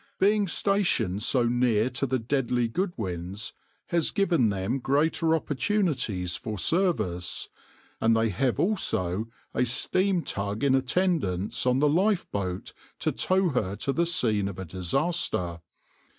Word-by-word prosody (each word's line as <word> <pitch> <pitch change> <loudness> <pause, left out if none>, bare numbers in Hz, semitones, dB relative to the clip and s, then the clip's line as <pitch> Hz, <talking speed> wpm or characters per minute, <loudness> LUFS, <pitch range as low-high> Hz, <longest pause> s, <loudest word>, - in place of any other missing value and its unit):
Being 205 +1 +3
stationed 170 - +1
so 125 +3 +2
near 120 -2 +2
to 125 +3 -1
the 130 +1 +1
deadly 125 -1 0
Goodwins 105 - -4 0.4
has 170 -2 +2
given 170 - +2
them 100 +6 -1
greater 160 +5 +2
opportunities 140 - 0
for 110 -2 -5
service, 110 - 0 0.5
and 115 0 +3
they 115 0 +2
have 125 +5 0
also 110 - 0 0.3
a - - +2
steam 180 - 0
tug 100 +3 -3
in 140 -2 +4
attendance 130 - 0
on 125 0 +3
the 150 +2 +3
lifeboat 145 - 0 0.2
to - - 0
tow 185 -1 +2
her 100 - -1
to 135 +6 -2
the 170 +2 +1
scene 110 - +2
of 95 -2 -6
disaster. 95 - -1
125 Hz, 130 wpm, -27 LUFS, 100-170 Hz, 0.5 s, in